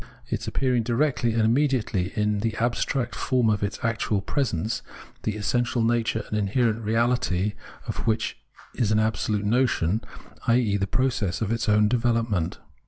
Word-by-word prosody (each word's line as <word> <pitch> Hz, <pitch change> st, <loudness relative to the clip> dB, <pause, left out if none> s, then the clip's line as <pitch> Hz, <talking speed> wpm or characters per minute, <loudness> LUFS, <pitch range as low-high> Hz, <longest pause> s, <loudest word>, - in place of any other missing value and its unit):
Its -, -, -3 dB
appearing 125 Hz, -3 st, +1 dB
directly 120 Hz, 0 st, +1 dB
and 115 Hz, -1 st, +2 dB
immediately 115 Hz, -6 st, +1 dB
is 105 Hz, -1 st, +1 dB
the 110 Hz, 0 st, -1 dB
abstract 120 Hz, +1 st, 0 dB
form 125 Hz, -4 st, +1 dB
of 105 Hz, -, 0 dB
its 100 Hz, 0 st, -2 dB
actual 115 Hz, -2 st, 0 dB
presence, 115 Hz, -, -1 dB, 0.4 s
the 110 Hz, -, -2 dB
essential 120 Hz, +2 st, 0 dB
nature 115 Hz, -1 st, +1 dB
and 105 Hz, -, -1 dB
inherent 110 Hz, +2 st, +1 dB
reality 110 Hz, -3 st, +1 dB, 0.3 s
of -, -, -4 dB
which 110 Hz, 0 st, 0 dB, 0.4 s
is 110 Hz, -3 st, 0 dB
an 110 Hz, -, +3 dB
absolute 105 Hz, -1 st, 0 dB
notion, 110 Hz, -4 st, +2 dB, 0.5 s
i.e. 115 Hz, -3 st, +3 dB
the 100 Hz, -1 st, 0 dB
process 110 Hz, -6 st, 0 dB
of 110 Hz, -2 st, -1 dB
its 115 Hz, -1 st, -1 dB
own 105 Hz, 0 st, +5 dB
development. 115 Hz, -6 st, 0 dB
115 Hz, 150 wpm, -25 LUFS, 105-120 Hz, 0.5 s, own